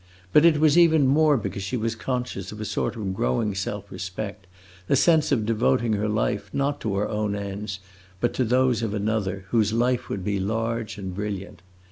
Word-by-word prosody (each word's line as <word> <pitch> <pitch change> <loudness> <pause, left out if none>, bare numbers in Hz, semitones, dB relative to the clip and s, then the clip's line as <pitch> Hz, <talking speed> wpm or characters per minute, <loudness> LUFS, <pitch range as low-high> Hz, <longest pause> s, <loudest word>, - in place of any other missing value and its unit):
But 150 - +7
it 160 -3 +5
was 155 +2 +5
even 160 -4 +5
more 150 +2 +4
because 100 -3 -4
she 100 +6 -2
was 115 0 -1
conscious 125 -6 -4
of 105 - -9
a 110 - -4
sort - - -2
of 100 -4 -3
growing 95 - 0
self 100 +1 -4
respect, 95 +1 -6 0.4
a - - +4
sense 155 +2 +4
of 115 -6 +2
devoting 110 - +1
her 105 +1 0
life 105 -2 -1
not 140 +1 -1
to 105 -3 -1
her 100 +2 0
own 105 -1 -1
ends, 100 0 -5 0.4
but 120 - 0
to 130 - +1
those 125 -1 +2
of 110 -2 -2
another, 100 -2 -1
whose 110 -2 +2
life 120 +1 +1
would 95 - -3
be 100 0 -1
large 115 +2 -2
and 95 -2 -5
brilliant. 100 -1 -5
110 Hz, 195 wpm, -25 LUFS, 100-125 Hz, 0.4 s, But